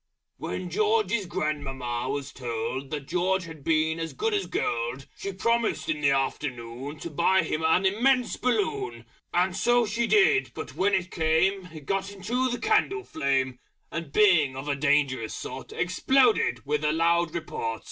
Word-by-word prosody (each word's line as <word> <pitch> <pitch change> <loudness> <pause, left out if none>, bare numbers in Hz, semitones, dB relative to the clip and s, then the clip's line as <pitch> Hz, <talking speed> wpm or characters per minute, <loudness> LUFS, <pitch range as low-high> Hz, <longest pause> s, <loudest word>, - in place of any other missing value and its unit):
_ - - -58 0.3
When - - -5
George's 425 - +1
Grandmamma 135 -6 -3
was 140 0 -4
told 125 +2 -4
That 145 -2 -5
George 185 +2 +1
had 160 -4 -10
been 160 +1 +1
as 165 0 -4
good 445 0 -1
as 405 -1 0
Gold, 120 +3 -2
She 200 - -5
Promised 230 +3 0
in 150 -1 -1
the 140 - +4
Afternoon 135 0 -2
To 170 - -6
buy 170 +4 +3
him 155 0 -2
an 165 +4 +3
Immense 245 +6 +2
BALLOON. 190 - -1 0.3
And 180 +1 +1
so 240 +4 +3
she 230 +2 -1
did; 415 0 +4
but - - -6
when 195 +1 +2
it 185 -1 -2
came, 175 +4 +1
It 155 -3 -10
got 195 +4 -1
into 235 +7 -1
the 245 - -2
candle 420 - +1
flame, 130 - -1 0.3
And 165 -3 -5
being 160 -8 +4
of 135 +2 -6
a 145 - 0
dangerous 140 -5 +1
sort 130 +1 -7
Exploded 240 - +2
with 150 +1 -1
a 150 - +2
loud 170 +1 +2
report! 115 -9 -3
165 Hz, 165 wpm, -27 LUFS, 140-205 Hz, 0.3 s, the